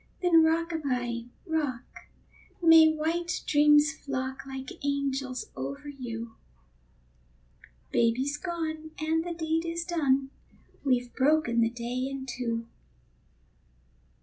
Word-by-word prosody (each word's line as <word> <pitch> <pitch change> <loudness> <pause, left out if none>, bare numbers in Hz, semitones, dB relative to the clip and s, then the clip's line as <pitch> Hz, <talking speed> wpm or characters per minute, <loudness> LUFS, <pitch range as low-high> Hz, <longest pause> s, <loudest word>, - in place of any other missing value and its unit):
Then 335 -2 +6
rock 330 +1 +2
a 325 - -2
by, 245 -5 -2 0.2
rock, 300 -8 -1 0.8
may 325 -2 +8
white 330 +2 -1
dreams 295 +1 +5
flock 265 -2 -5
Like 265 0 -8
angels 275 -3 -2
over 140 - -5
you; 235 -4 -7 1.5
Baby's 255 +5 +2
gone, 315 -2 -4
and 320 +1 +1
the 345 0 -4
deed 320 0 0
is 335 0 -3
done, 275 -6 +1 0.5
We've 250 -3 +1
broken 270 -4 +3
the 230 - +3
day 245 +2 -3
in 275 -1 -5
two. 235 -2 -3
280 Hz, 110 wpm, -28 LUFS, 250-320 Hz, 1.5 s, may